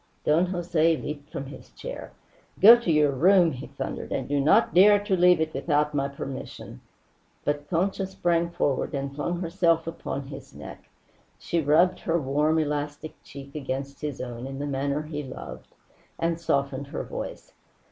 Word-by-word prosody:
Don 165 +4 +3
Jose 170 -3 +1
leaped 145 -1 -7
from 135 - -5
his 135 - -11
chair. - - -8 0.5
"Go 225 +4 +10
to 235 -8 -1
your 150 -2 +4
room!" 175 +4 +4
he 130 -3 -7
thundered. - - -6
"And - - -2
do 145 0 0
not 140 +2 +4
dare 205 +4 +7
to 200 -2 +1
leave 180 -1 +5
it 160 0 -1
without 150 -1 0
my 140 -1 0
permission 135 -1 -8 0.3
" - - -39
But 145 0 -2
Concha 190 +3 0
sprang 170 -2 0
forward 145 -5 -1
and 140 0 -3
flung 170 +5 -3
herself 165 -2 +1
upon 140 -4 -5
his 135 -1 -10
neck. - - -11 0.5
She 170 - -1
rubbed 160 +5 +3
her 170 0 0
warm 150 +3 +1
elastic 150 0 -2
cheek 140 0 -11
against 135 -1 -5
his 150 -3 -4
own 120 0 -6
in 135 0 -6
the 145 - -3
manner 140 +1 -1
he 150 -1 -5
loved, 65 - -9 0.5
and 165 0 -1
softened 140 -3 -1
her - - -4
voice. - - -7
150 Hz, 170 wpm, -26 LUFS, 140-170 Hz, 0.5 s, Go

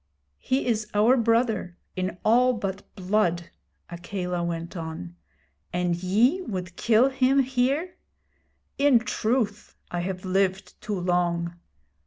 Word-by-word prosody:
'He 260 +2 0
is 220 -3 0
our 220 +5 +5
brother 230 -6 +1 0.2
in 185 -1 -3
all 250 +3 +5
but 195 -3 -4
blood,' 180 -3 0 0.4
Akela 180 0 -3
went 170 +1 -4
on; 160 - -6 0.6
'and 175 -1 0
ye 215 - +2
would 185 - -5
kill 230 +5 +4
him 270 +1 +3
here! 265 +7 0 0.8
In 280 -3 +6
truth, 225 -2 -1 0.2
I 175 - -2
have 185 +1 -4
lived 190 0 -1
too 210 -3 -3
long. 175 -1 0
195 Hz, 120 wpm, -26 LUFS, 180-240 Hz, 0.8 s, In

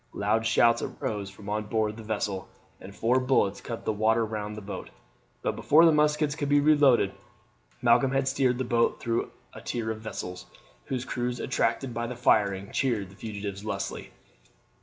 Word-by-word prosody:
Loud 110 +3 +1
shouts 115 +1 +4
arose 100 -2 -4
from 100 +1 -13
on 105 +1 -2
board 110 0 0
the 115 - -9
vessel, 105 -3 -3 0.3
and 100 +1 -11
four 125 +3 +2
bullets 125 -6 +1
cut 115 -2 -6
the 110 - +1
water 110 +2 +2
round 105 -1 -5
the - - -6
boat; 100 0 -7 0.5
but - - -1
before 160 +3 +5
the 165 - +7
muskets 150 -1 +2
could 145 -2 -3
be 145 0 +5
reloaded 145 -9 +4 0.7
Malcolm 120 +2 +5
had 135 0 +1
steered 130 -2 +2
the 130 - -1
boat 120 -1 +1
through 115 0 -1 0.2
a - - -10
tier 115 -2 -3
of 110 0 -6
vessels, 90 -4 -6 0.4
whose 130 -1 -3
crews, 125 -1 -3
attracted 130 -3 -1
by 115 +1 -2
the 125 - -5
firing, 100 -4 +2
cheered 110 -8 -1
the - - -15
fugitives 100 -2 -6
lustily. 100 -2 -4
115 Hz, 180 wpm, -27 LUFS, 105-125 Hz, 0.7 s, the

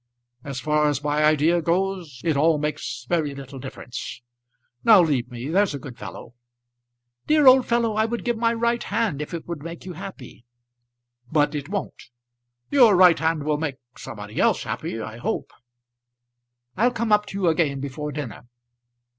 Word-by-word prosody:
As 135 -2 -5
far 150 +2 +2
as 145 0 -2
my 150 +1 +1
idea 155 +3 +3
goes, 170 -5 -1
it 160 -3 +1
all 155 +2 +3
makes 150 -4 -4
very 150 -3 0
little 135 0 -9
difference. 125 -2 -7 0.6
Now 220 -3 +8
leave 140 -7 0
me; 125 +3 -6
there's 190 -1 +2
a - - -3
good 135 -2 -9
fellow." 120 0 -9 0.9
"Dear 305 -1 +4
old 260 0 +7
fellow, 235 -2 +1
I 220 +1 +2
would 235 +2 -4
give 240 -1 +1
my 230 +1 +1
right 235 +1 0
hand 205 -11 -1
if 150 - -6
it 170 -2 -6
would 170 -4 -5
make 170 +3 -8
you 185 - -6
happy!" 175 -10 -10 0.9
"But 150 -1 +2
it 145 +1 -5
won't. 200 - -5 0.6
Your 245 -8 +6
right 180 -2 +6
hand 160 -2 0
will 150 0 0
make 150 -4 -2 0.2
somebody 105 -5 -8
else - - +2
happy, 115 - -4
I 110 0 -6
hope." 120 - -3 1.2
"I'll 235 +6 +3
come 235 -2 -2
up 210 0 +4
to 195 - -6
you 185 - +1
again 155 -4 +1
before 140 +2 -5
dinner." 130 -5 -7
155 Hz, 170 wpm, -24 LUFS, 140-195 Hz, 1.2 s, Now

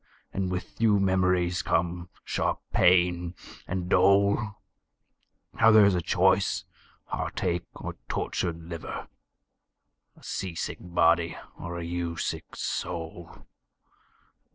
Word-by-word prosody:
And 95 -1 -1
with 90 +4 -5
you 105 -3 +5
memories 90 -2 +2
come, 85 0 -1 0.2
sharp - - -1
pain, 90 -1 +3 0.3
and 90 -1 -2
dole. 100 +3 +3 1.0
Now 110 - +5
there's 105 -3 +7
a 90 - +1
choice - - +2 0.4
heartache 90 -1 -2
or - - -6
tortured 85 -2 -2
liver! 85 0 -6 1.1
A - - -19
sea 95 -3 -4
sick - - -4
body, 85 -1 +2 0.2
or 85 0 -6
a 85 - -4
you 85 0 -3
sick - - -4
soul! 85 0 -5
90 Hz, 105 wpm, -27 LUFS, 85-95 Hz, 1.1 s, there's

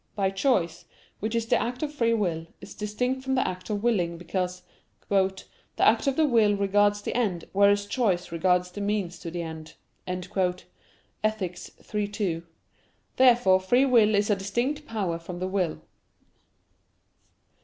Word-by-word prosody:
But 195 -2 0
choice, 195 -7 +1 0.3
which 220 +2 -2
is 230 -1 0
the - - +2
act 245 +4 -3
of 300 -1 -3
free 230 -5 +2
will, 165 -6 -1
is - - -11
distinct 250 +5 -2
from 265 0 0
the 260 - +1
act 185 +2 -6
of 205 -1 -2
willing, 180 -8 +1
because 180 +1 -3 0.5
"the 195 -2 +4 0.5
act - - +3
of 275 - +2
the 315 - +3
will 225 -6 +4
regards 205 +1 +2
the - - -3
end, 200 -9 0
whereas 200 +1 +4
choice 195 -6 0
regards 180 +2 +1
the 205 - -6
means 200 -4 -2
to 170 - -6
the 170 0 -4
end" 160 -1 -8 0.3
(Ethic. 180 +1 -4 0.3
iii, 210 -1 0
2). 195 -5 -2 0.7
Therefore 240 -7 +5
free 245 +8 +3
will 225 -5 +4
is 205 +1 +2
a - - +4
distinct 240 +10 -2
power 190 -7 -2
from 175 +1 -8
the 185 +1 -2
will. 185 -4 -1
200 Hz, 155 wpm, -26 LUFS, 180-230 Hz, 0.7 s, Therefore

